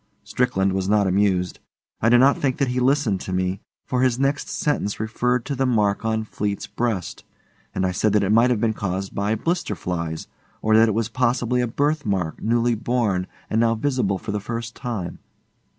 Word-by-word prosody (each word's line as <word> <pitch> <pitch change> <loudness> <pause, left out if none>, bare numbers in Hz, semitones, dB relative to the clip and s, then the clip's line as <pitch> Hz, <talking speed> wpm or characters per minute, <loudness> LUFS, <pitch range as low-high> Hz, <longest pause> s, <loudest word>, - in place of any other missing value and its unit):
Strickland 100 -7 0
was 95 0 -1
not 105 -1 +3
amused. 95 -1 +1 0.4
I 115 - +4
do 120 - +6
not 135 +3 +5
think 130 -3 -1
that 140 -3 +1
he 125 +1 0
listened 125 -6 +2
to - - -6
me, 95 +1 -1 0.2
for 125 -1 0
his 130 -2 +2
next 140 +2 0
sentence 145 - -1
referred 120 +3 0
to 140 - -2
the 135 0 +1
mark 105 -4 +1
on 110 0 0
Fleete's 105 -1 -3
breast, 110 -7 -3 0.5
and 95 - +1
I 90 - +1
said 105 +4 +1
that 105 -1 +3
it 100 - +1
might 115 +3 +5
have 120 -4 +1
been 110 0 +1
caused 95 -2 -3
by 100 +2 0
blister 165 - -1
flies, 85 -3 -4 0.3
or 110 0 +2
that 110 +1 +6
it 105 - -1
was 115 -1 0
possibly 125 0 +1
a 120 - 0
birth 145 +5 0
mark 95 -6 -2
newly 120 +2 +2
born 110 -5 0 0.2
and 110 - +1
now 115 0 +3
visible 120 -5 0
for 105 - -6
the 105 - -1
first 115 +2 -5
time. 110 -9 -5
110 Hz, 200 wpm, -23 LUFS, 100-125 Hz, 0.5 s, do